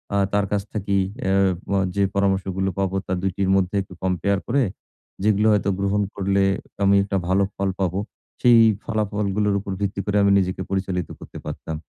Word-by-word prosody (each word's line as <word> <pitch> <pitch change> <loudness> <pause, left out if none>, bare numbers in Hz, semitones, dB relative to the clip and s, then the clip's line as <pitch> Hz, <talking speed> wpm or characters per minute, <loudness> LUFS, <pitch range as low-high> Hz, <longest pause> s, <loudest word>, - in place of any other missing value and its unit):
আ - - +3 0.2
তার 100 0 +2
কাছ 105 -1 +1
থেকে 100 -2 -2 0.3
অ্যা 95 - 0 0.4
ব - - -3 0.2
যে 100 - +2
পরামর্শগুলো 95 -1 0
পাবো, 95 -1 0
তার 90 - -2
২ 95 - 0
টির 95 -1 0
মধ্যে 95 0 +1
একটু 95 - -10
কম্পেয়ার 95 +2 +1
করে, 135 +3 +2 0.6
যেগুলো 105 +1 +3
হয়তো 100 -1 +1
গ্রহণ 100 +1 +1
করলে 100 0 +1 0.4
আমি 100 0 +5
একটা 100 0 -1
ভালো 95 +2 +3
ফল 100 0 -1
পাবো, 95 0 0 0.4
সেই 120 -2 +7 0.2
ফলাফলগুলোর 105 -1 0
উপর 100 0 -6
ভিত্তি 100 -1 -2
করে 105 0 +1
আমি 100 - +4
নিজেকে 95 0 -2
পরিচালিত 95 -2 -2
করতে - - -11
পারতাম। 80 - -5
100 Hz, 175 wpm, -23 LUFS, 95-100 Hz, 0.6 s, সেই